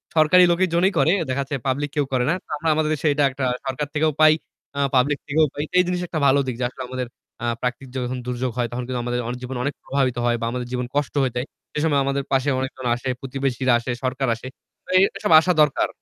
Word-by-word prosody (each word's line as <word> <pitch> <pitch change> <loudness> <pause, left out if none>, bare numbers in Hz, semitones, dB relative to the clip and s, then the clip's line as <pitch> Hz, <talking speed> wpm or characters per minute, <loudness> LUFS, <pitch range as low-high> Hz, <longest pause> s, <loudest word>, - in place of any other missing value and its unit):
সরকারি 160 +4 +6
লোকের 185 +2 +3
জন্যেই 185 +3 +3
করে। 165 - +4 0.2
দেখাচ্ছে 140 +2 -2
পাবলিক 145 +2 0
কেউ 145 -2 +1
করে 125 -1 +1
না। - - +3
তো - - -38
আমরা 160 +2 -1
আমাদের 155 0 +1
দেশে 150 +2 -2
এটা 145 0 +1
একটা 130 0 -3 0.2
সরকার 135 +2 -2
থেকেও 155 +1 +2
পাই, 155 0 +8 0.4
আ - - -1 0.2
পাবলিক 140 +3 +3
থেকেও 155 +2 +3
পাই। 145 - -3
তো - - -33
এই - - +6
জিনিস 180 0 -1
একটা 155 - -3
ভালো 135 +1 +4
দিক 125 - -2
যে - - -1
আসলে 130 - -10
আমাদের 130 -1 -4 0.4
আ - - -1 0.2
প্রাকৃতিক 125 +1 -3
যখন 130 - -1 0.3
দুর্যোগ 125 0 -2
হয় 120 -1 +1
তখন 125 +1 -3
কিন্তু 125 -1 -2
আমাদের 120 0 -1
অনেক 125 +1 -3
জীবন 125 0 -5
অনেক 145 0 -1
প্রভাবিত 130 -3 0
হয় 120 0 +2
বা - - -1
আমাদের 125 -1 -4
জীবন 125 -1 -2
কষ্ট 145 -2 0
হয়ে 125 -2 -1
যায়। 125 +2 -1 0.3
সে 150 - -2
সময় 145 -3 +3
আমাদের 140 0 -1
পাশে 135 +1 +2
অনেকজন 130 -1 -5
আসে, 130 +2 -4
প্রতিবেশীরা 130 -1 0
আসে, 120 +1 -4
সরকার 130 0 -1
আসে। 125 +3 -9 0.4
তো - - -20
এ - - +7 0.2
এসব 210 - -2
আসা 180 +3 +2
দরকার। 150 -2 +3
135 Hz, 245 wpm, -22 LUFS, 125-150 Hz, 0.4 s, পাই